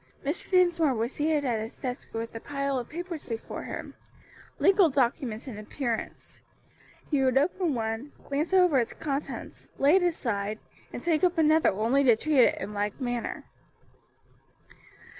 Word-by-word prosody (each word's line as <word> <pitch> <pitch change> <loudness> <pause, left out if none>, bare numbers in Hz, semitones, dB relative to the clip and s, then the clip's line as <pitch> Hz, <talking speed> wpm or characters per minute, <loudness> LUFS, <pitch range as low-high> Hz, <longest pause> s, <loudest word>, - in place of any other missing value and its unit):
Mr. 295 +6 -2
Dinsmore 345 -6 +3
was 230 +3 -2
seated 300 -1 0
at 235 -4 0
his 220 +2 -6
desk 250 -1 -5
with 225 0 -4
a 225 - -5
pile 275 0 -2
of 240 - -7
papers 340 -1 -5
before 225 -2 -6
him - - -6 0.6
legal 390 -3 +5
documents 255 -3 -1
in 220 -5 -6
appearance; 230 +2 -5 0.7
he 285 -3 +2
would 260 0 +3
open 320 +1 +1
one, 225 +4 -3 0.2
glance 290 +5 -1
over 360 -7 +5
its 235 - -1
contents, 285 -2 -5
lay 290 +6 +5
it - - +2
aside, 215 - -1 0.3
and - - -7
take 325 -2 +1
up 360 -1 +3
another 315 0 +4
only 230 +8 +2
to 240 -4 +6
treat 300 +4 +1
it - - -2
in 210 - -5
like 205 +2 -2
manner. 245 -2 -3
275 Hz, 160 wpm, -28 LUFS, 230-315 Hz, 0.7 s, to